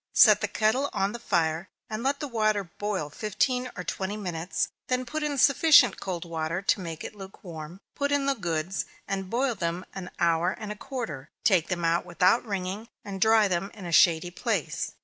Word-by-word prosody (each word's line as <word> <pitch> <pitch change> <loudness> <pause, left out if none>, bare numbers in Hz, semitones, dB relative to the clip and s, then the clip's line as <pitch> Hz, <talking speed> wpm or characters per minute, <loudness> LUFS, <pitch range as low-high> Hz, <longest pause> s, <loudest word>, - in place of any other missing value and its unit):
Set - - +7
the - - +1
kettle 250 +6 +1
on 195 +1 0
the 235 - -6
fire, 165 -4 0 0.2
and 215 +1 -4
let 275 +3 0
the 295 - -3
water 215 -4 +1
boil 190 -2 -3
fifteen 215 - -1
or 180 - -4
twenty 195 +3 -3
minutes; 175 -3 -2 0.2
then 255 0 0
put 310 +5 -3
in 295 -2 -1
sufficient 280 0 +6
cold 180 -3 -4
water 165 0 -2
to 195 - +1
make 165 -3 -6
it - - -6
lukewarm, 180 -4 -9
put 285 0 -1
in 285 -1 +2
the 275 - +3
goods, 175 -4 -2 0.2
and 195 -1 -3
boil 250 +3 +1
them 175 -2 -3
an 185 -2 -6
hour 170 +1 +2
and 215 -2 -7
a - - -4
quarter 210 - -6
take 185 -8 +4
them 175 -2 -2
out 165 +1 +2
without 180 +5 +3
wringing, 200 +1 -4 0.2
and 195 -2 -6
dry 220 -1 +5
them 190 +1 -1
in 195 - -9
a 170 - -4
shady 170 +1 +5
place. - - -2
195 Hz, 195 wpm, -27 LUFS, 170-230 Hz, 0.2 s, Set